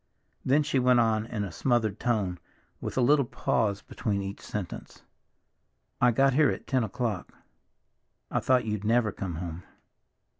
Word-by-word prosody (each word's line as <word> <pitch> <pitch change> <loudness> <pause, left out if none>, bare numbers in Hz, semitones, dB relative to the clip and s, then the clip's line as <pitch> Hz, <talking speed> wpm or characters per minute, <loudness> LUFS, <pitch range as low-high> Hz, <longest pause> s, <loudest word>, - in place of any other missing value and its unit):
Then 145 +4 +3
she 145 -2 +1
went 125 -1 +4
on 110 -1 +2
in 105 -3 -3
a 100 - -5
smothered 115 -5 0
tone, 100 -8 0 0.4
with - - -5
a - - +4
little 140 +3 +5
pause 110 -4 -1
between 100 -3 -2
each 100 +1 -6
sentence, 100 -4 -7 1.0
"I 125 - +6
got 135 +3 +3
here 145 0 +4
at - - -4
ten 130 -3 +1
o'clock. 110 -2 -3 1.0
I - - +1
thought 130 -2 +2
you'd 105 -2 -2
never 110 0 +2
come 95 -3 -5
home. 85 0 -5
110 Hz, 155 wpm, -28 LUFS, 100-125 Hz, 1.0 s, I